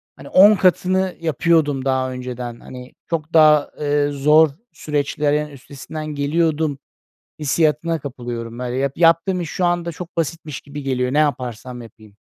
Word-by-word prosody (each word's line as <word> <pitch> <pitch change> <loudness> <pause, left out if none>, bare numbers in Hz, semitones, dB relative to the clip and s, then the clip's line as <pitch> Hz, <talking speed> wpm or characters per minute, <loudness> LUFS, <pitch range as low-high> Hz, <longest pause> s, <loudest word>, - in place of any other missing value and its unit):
hani, - - -12
10 205 +3 +7
katını 185 0 +1
yapıyordum 155 -3 +1
daha 130 -1 0
önceden. 125 -2 -6
Hani, 125 0 -11
çok 160 -1 -3
daha, 155 -2 +5
eee, 145 0 +1
zor 150 +3 +4 0.2
süreçlerin 150 0 -1
üstesinden 145 +2 -9
geliyordum, 150 0 0 0.6
hissiyatına 155 +2 +1
kapılıyorum. 120 -3 -7
Böyle 125 0 -3
yap 135 0 -1
yaptığım 170 +2 +3
iş 160 - -5
şu 185 - -1
anda 175 -1 0
çok 170 +1 -10
basitmiş 160 -3 -3
gibi 145 0 -8
geliyor, 125 -1 -1
ne 150 - +1
yaparsam 125 -3 -2
yapayım. 110 -3 -15
145 Hz, 140 wpm, -20 LUFS, 130-165 Hz, 0.6 s, 10